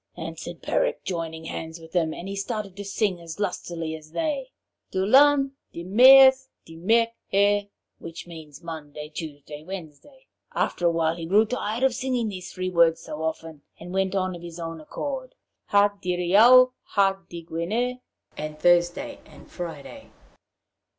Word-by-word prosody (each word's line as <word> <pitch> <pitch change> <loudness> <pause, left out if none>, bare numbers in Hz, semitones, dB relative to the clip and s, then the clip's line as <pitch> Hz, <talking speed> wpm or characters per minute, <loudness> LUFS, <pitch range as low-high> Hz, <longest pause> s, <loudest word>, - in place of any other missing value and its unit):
answered 165 +1 -7
Peric, - - 0
joining 165 -3 -4
hands 160 0 -6
with 160 0 -14
them; 165 -3 +1
and 175 - -7
he 200 - -5
started 200 -1 -4
to 205 - -6
sing 195 -2 -1
as 165 +2 -9
lustily 170 -5 -3
as 155 0 -13
they: 280 - -2 0.4
'Dilun, 275 +8 +4 0.2
Dimeurs, 260 +8 +7 0.2
Dimerc'her,' 205 +2 +1 0.3
which 165 0 -8
means 160 -2 -11
'Monday, 150 -2 -8
Tuesday, 150 -2 -8
Wednesday.' 185 - -10 0.3
After 175 - 0
a - - +3
while 165 0 0
he 165 -1 -6
grew 210 +5 +4
tired 230 0 -3
of 265 -2 +4
singing 245 -2 -1
these 185 -3 -7
three 185 0 -3
words 165 -2 +4
so 155 -1 -7
often, 160 -1 -4 0.2
and 175 +2 -9
went 190 0 0
on 185 -1 -1
of 170 - -10
his 170 0 -9
own 165 -1 -6
accord: 260 - -6 0.3
'Ha 205 0 +4
Diriaou, 205 +9 +6
ha 195 -1 +1
Digwener,' 175 +9 -3 0.4
(And 150 0 -6
Thursday 175 - +2
and - - -16
Friday!) 175 - -8
180 Hz, 145 wpm, -25 LUFS, 165-225 Hz, 0.4 s, Dimeurs